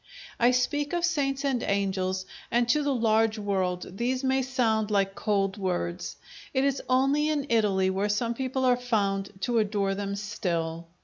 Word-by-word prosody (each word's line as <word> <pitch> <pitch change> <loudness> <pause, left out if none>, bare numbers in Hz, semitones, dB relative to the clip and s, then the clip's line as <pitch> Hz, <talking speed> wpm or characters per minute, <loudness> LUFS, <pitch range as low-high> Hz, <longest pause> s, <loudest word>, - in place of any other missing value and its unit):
I 240 - +5
speak 285 +4 0
of 345 0 +2
saints 280 -5 0
and 260 -4 +1
angels; 190 -2 -1 0.2
and 240 0 +2
to 300 +4 +4
the 285 -1 0
large 225 -1 +2
world 190 -3 -2
these 255 +3 -1
may 265 0 +2
sound 230 -5 +1
like 195 -2 +1
cold 195 -1 0
words. 180 -2 -2 0.4
It 265 - +3
is 275 -1 0
only 275 +4 +3
in 295 -3 0
Italy 200 -5 +2
where 195 +2 -1
some 230 +3 0
people 260 +1 -2
are 250 -1 +5
found 200 -5 0
to 235 +3 +1
adore 200 -2 0
them 200 0 -3
still. 170 -5 -3
220 Hz, 170 wpm, -27 LUFS, 195-260 Hz, 0.4 s, I